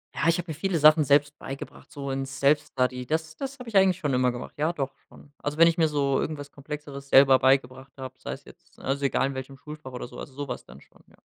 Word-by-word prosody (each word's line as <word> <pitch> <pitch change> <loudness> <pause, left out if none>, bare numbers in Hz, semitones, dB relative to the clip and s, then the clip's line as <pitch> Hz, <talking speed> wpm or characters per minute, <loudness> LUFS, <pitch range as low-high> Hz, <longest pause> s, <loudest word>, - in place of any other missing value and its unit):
Ja, - - 0
ich 165 - +3
habe 175 -2 -4
mir - - -3
viele 175 +3 -1
Sachen 155 +1 +7
selbst 145 +1 +3
beigebracht, 135 +1 -8
so 140 -2 -5
in 135 0 -2
Self-Study. 130 -2 0
Das 160 +1 -2
das 275 +5 -6
habe 250 -3 -9
ich 220 - -9
eigentlich 190 -2 +5
schon 145 -6 -1
immer 125 0 +3
gemacht. 120 - -7
Ja, 155 +3 +1
doch 140 -5 -3 0.2
schon. 145 - -17
Also, 145 +1 -4
wenn 165 +1 +8
ich 170 0 +2
mir 160 - +5
so 140 -3 +1
irgendwas 145 -2 -5
Komplexeres 140 -1 -8
selber 135 -1 +7
beigebracht 130 0 +1
habe, 130 -1 -7
sei - - -5
es - - -10
jetzt - - -19
also, 140 +1 -2
egal 135 - +2
in 140 - -4
welchem 130 +1 -7
Schulfach 150 0 -10
oder 125 - -6
so, - - -11
also, 135 - -9
so 145 0 -5
was - - -6
dann 70 +3 -14
schon, - - -23
ja. - - -23
140 Hz, 255 wpm, -26 LUFS, 135-155 Hz, 0.2 s, wenn